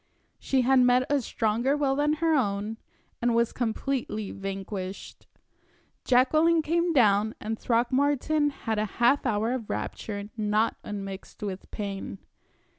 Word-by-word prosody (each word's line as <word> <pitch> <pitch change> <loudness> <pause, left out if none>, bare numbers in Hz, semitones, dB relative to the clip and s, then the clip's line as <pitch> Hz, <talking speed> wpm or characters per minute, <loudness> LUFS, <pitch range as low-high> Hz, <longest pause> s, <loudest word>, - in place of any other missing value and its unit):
She 265 -1 +1
had 260 +1 +4
met 250 0 +4
a 285 -1 +3
stronger 235 +5 0
will 275 -2 +1
than 295 +1 +2
her 325 +1 +1
own, 210 -4 0 0.4
and 235 -1 +2
was 235 0 +2
completely 230 -3 -2
vanquished. 195 0 -6 0.8
Jacqueline 310 +6 +4
came 340 +2 +1
down, 215 -6 +3
and 220 +1 -4
Throckmorton 285 +5 +1
had 225 -6 -3
a 215 - +1
half 245 +3 +3
hour 220 +1 0
of 250 -4 -4
rapture 205 -1 -4
not 215 0 +1
unmixed 195 -1 -7
with 195 -2 -5
pain. 200 -2 -5
235 Hz, 130 wpm, -27 LUFS, 210-275 Hz, 0.8 s, had